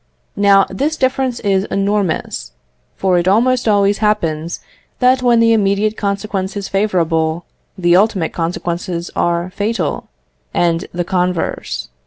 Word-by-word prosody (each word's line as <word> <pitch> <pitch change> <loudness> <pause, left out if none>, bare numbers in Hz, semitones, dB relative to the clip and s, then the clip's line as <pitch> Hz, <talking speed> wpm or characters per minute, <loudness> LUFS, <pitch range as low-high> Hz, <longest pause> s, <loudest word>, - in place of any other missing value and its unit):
Now 200 -1 +5
this 290 +11 -2
difference 260 -1 0
is 195 -2 +1
enormous, 195 - -2 0.4
for 185 -2 +2
it 175 - -1
almost 245 +5 +2
always 200 -1 +3
happens 170 -7 -1 0.4
that 255 +1 +3
when 240 -2 +4
the 230 0 +4
immediate 210 0 +1
consequence 200 -1 -3
is 200 -1 -4
favourable, 170 -5 0 0.3
the 175 -1 +3
ultimate 190 -4 +2
consequences 170 +1 -3
are 170 +1 0
fatal, 205 -6 -2 0.5
and 170 +1 +1
the 175 0 -2
converse. 175 - -2
195 Hz, 125 wpm, -17 LUFS, 175-215 Hz, 0.5 s, Now